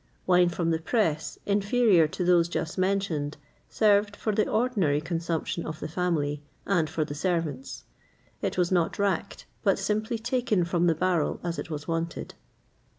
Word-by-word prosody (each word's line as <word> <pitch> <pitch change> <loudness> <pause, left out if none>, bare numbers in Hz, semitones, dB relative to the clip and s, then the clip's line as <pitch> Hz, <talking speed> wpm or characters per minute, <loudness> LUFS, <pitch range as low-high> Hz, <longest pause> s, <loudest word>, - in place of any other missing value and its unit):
[XXVIII - - -37
53] 185 - -1
Wine 180 0 +5
from 170 -1 -1
the 160 - +1
press, 160 -4 -1
inferior 200 -3 +3
to 180 +4 -3
those 175 -1 +4
just 160 -2 -3
mentioned, 185 -6 -1 0.3
served 205 -1 +3
for 215 - -2
the 210 +1 +2
ordinary 215 - +1
consumption 165 +1 -2
of 155 -1 -6
the - - -4
family, 155 -4 -1 0.2
and 170 -6 +1
for 155 +1 -1
the 145 - -6
servants.[XXVIII 150 -4 -5
54] - - 0
It - - -4
was 180 0 +1
not 175 -3 +1
racked, 200 -1 -1 0.2
but - - +3
simply 215 +2 -1
taken 235 -5 0
from 175 0 +1
the 165 - +3
barrel 175 -2 0
as 170 -1 -3
it - - -6
was 150 -2 -5
wanted. 165 0 -3
175 Hz, 175 wpm, -27 LUFS, 160-200 Hz, 0.3 s, Wine